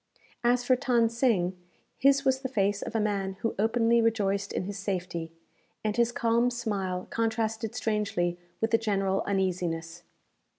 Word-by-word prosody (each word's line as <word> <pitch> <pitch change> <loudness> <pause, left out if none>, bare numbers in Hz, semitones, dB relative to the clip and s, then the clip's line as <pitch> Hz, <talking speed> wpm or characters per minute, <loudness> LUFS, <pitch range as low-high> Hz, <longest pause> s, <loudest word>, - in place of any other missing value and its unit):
As 245 +1 +3
for 255 - +5
Than 240 -3 +2
Sing, 225 -7 +1 0.4
his 275 +1 +4
was 265 0 +3
the 260 -1 -4
face 205 -4 +1
of - - -6
a - - +3
man 200 -2 -1
who 225 - 0
openly 230 +2 +3
rejoiced 200 -3 +1
in - - -2
his 200 +1 -5
safety, 180 -4 -3 0.5
and 215 -1 0
his 235 0 +2
calm 235 +1 +2
smile 200 -7 -2
contrasted 225 0 -1
strangely 200 -6 -1 0.2
with 225 - +1
the 225 - +4
general 195 -3 0
uneasiness. 175 -4 -1
215 Hz, 155 wpm, -28 LUFS, 195-235 Hz, 0.5 s, for